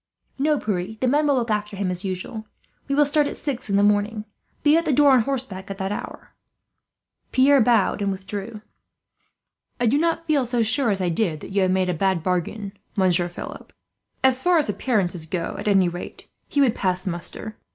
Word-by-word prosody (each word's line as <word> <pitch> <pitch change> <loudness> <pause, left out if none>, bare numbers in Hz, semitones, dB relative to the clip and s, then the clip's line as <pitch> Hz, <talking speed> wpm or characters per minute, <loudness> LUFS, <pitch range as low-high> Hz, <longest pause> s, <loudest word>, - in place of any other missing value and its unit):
"No, 300 +2 +2
Pierre; 205 -2 -3
the 255 - +1
men 295 +4 +2
will 285 - +3
look 235 -3 -1
after 210 -1 -2
him, 190 -2 -1
as 180 +2 -5
usual. 190 +3 -5 0.4
We 275 - 0
will 295 0 +5
start 290 0 +2
at - - -6
six 270 -7 -4
in 200 - +1
the 200 - +4
morning. 210 +1 +1 0.4
Be 300 0 +5
at 335 - +3
the 310 - 0
door, 285 +1 +5
on 255 -2 +6
horseback, 230 -7 -4
at 195 - -5
that 190 0 -3
hour." 205 - -7 1.0
Pierre 270 +1 +5
bowed 220 -3 +2
and 200 -1 0
withdrew. 200 +3 -6 1.2
"I 245 - +1
do 260 +6 +3
not 330 0 0
feel 290 -6 +1
so 240 -1 +1
sure 240 +3 +1
as 195 -2 0
I 180 - +1
did 165 -3 0
that - - -9
you 200 0 +1
have 185 - +2
made 185 0 +1
a 180 - 0
bad 185 0 0
bargain, 190 +3 -2 0.2
Monsieur 180 -3 +3
Philip. 175 - -9 0.5
As 260 -1 +4
far 355 +2 +3
as 305 - +1
appearances 190 -8 -1
go, 170 0 -3
at - - -5
any 195 -3 +4
rate, 175 +1 -7 0.2
he 285 - +1
would 255 -5 +4
pass 185 -3 0
muster. 185 +4 -5
210 Hz, 205 wpm, -23 LUFS, 190-265 Hz, 1.2 s, on